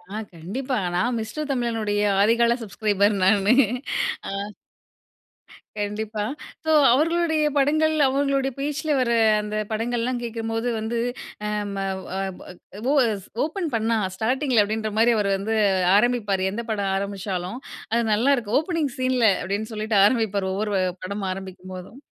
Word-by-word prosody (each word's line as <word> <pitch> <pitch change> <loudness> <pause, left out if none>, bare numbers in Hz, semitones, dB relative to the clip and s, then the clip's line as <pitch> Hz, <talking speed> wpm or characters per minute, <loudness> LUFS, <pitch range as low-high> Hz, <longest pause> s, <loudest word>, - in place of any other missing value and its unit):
ஆ - - -2 0.2
கண்டிப்பா 235 - -4 0.2
நான் 215 +8 +1
மிஸ்டர் 255 +8 -4
தமிழனுடைய, 225 -5 -1 0.2
ஆதிகால 235 +3 +4
சப்ஸ்கிரைபர் 205 -1 +1
நானு. 200 +3 +4 0.8
அ. - - -4 1.5
கண்டிப்பா, 210 +1 -3 0.4
ஸோ 315 - +2 0.2
அவர்களுடைய 315 +2 +2
படங்கள், 310 +3 +3
அவங்களுடைய 275 0 +1
பேச்சில 295 +2 -2
வர 240 -2 +1 0.3
அந்த 210 0 -5 0.2
படங்கள்லாம் 240 +2 -1
கேக்கும்போது 225 0 -3
வந்து, 225 +2 -2 0.5
அ 210 - -1 0.2
ம - - -5 0.3
ஓ - - -12
அ - - -1 0.2
பொ - - -13 0.4
ஓ - - +3 0.2
எஸ் 200 -3 -5 0.2
"ஓப்பன் 330 +2 -2
பண்ணா 225 0 +1 0.2
ஸ்டார்ட்டிங்கில" 250 +2 +2
அப்டின்ற 215 +1 -2
மாரி 235 +2 +5
அவர் 205 -2 +1
வந்து 210 +3 -2 0.4
ஆரம்பிப்பாரு. 210 -4 +1
எந்த 230 +4 -3
படம் 200 -3 -1
ஆரம்பிச்சாலும். 195 +1 -3 0.3
அது 235 +1 +2
நல்லாருக்கும். 235 -1 +2
"ஓப்பனிங் 320 -3 -1
சீன்ல" 255 -2 +1 0.2
அப்டின்னு 205 +5 -3
சொல்லிட்டு 215 0 -1
ஆரம்பிப்பாரு. 205 -4 +1
ஒவ்வொரு 210 +2 -2 0.3
படம் 200 +2 -4
ஆரம்பிக்கும்போதும். 185 +3 -8
225 Hz, 130 wpm, -24 LUFS, 205-255 Hz, 1.5 s, மாரி